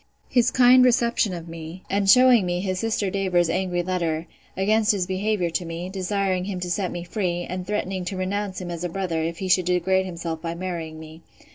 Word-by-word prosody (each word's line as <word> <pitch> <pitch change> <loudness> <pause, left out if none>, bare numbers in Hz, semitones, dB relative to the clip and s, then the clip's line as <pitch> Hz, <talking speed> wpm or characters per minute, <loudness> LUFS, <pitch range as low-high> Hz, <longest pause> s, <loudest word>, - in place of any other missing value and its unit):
His 245 -1 +3
kind 255 0 +6
reception 235 -4 +2
of 170 -2 -6
me, 165 +2 -9
and 200 0 0
shewing 250 -1 +7
me 175 0 -1
his 185 -1 -2
sister 215 -3 -1
Davers's 180 -4 +1
angry 180 -2 -1
letter, 170 -3 -1 0.3
against 210 +3 +3
his 190 -3 -1
behaviour 190 -1 -1
to 180 - -1
me, 170 +2 -5
desiring 190 -1 -1
him 190 -2 -4
to 180 0 -3
set 185 0 0
me 175 -1 -5
free, 175 -2 -2
and 180 0 -5
threatening 195 -2 -2
to 190 +1 -4
renounce 190 +1 -2
him 180 -2 -6
as 170 0 -5
a 175 - -2
brother, 170 -2 -2
if 165 +1 -3
he 190 - -4
should 185 -1 +3
degrade 185 +1 +1
himself 170 -2 -5
by 170 -1 -4
marrying 170 -3 -5
me. 160 +1 -11
185 Hz, 210 wpm, -24 LUFS, 175-200 Hz, 0.3 s, shewing